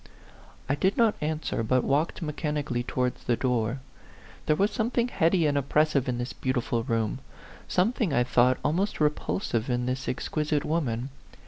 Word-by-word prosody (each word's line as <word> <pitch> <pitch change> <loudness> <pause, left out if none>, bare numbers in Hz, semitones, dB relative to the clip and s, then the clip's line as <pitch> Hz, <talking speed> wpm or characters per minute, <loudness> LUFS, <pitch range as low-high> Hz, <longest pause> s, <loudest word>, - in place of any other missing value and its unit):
I 135 - +1
did 190 +7 +1
not 230 -3 +4
answer, 155 -5 -2
but 125 +3 +2
walked 150 +5 0
mechanical 150 -3 -2
ly 120 - 0
towards 125 -1 -1
the 120 - +1
door. 125 0 0 0.7
There 155 - +4
was 200 +6 +2
something 235 +2 0
heady 170 -4 +2
and 145 -1 +2
oppressive 140 -1 +2
in 125 - -1
this 120 +1 -4
beautiful 125 -2 -1
room; 115 -2 -1 0.5
something, 210 - +1
I 125 -3 +3
thought, 125 +1 +3
almost 180 +8 0
repulsive 150 - 0
in 125 0 0
this 130 +1 -2
exquisite 150 +3 -1
woman. 135 -5 -1
140 Hz, 155 wpm, -27 LUFS, 125-160 Hz, 0.7 s, not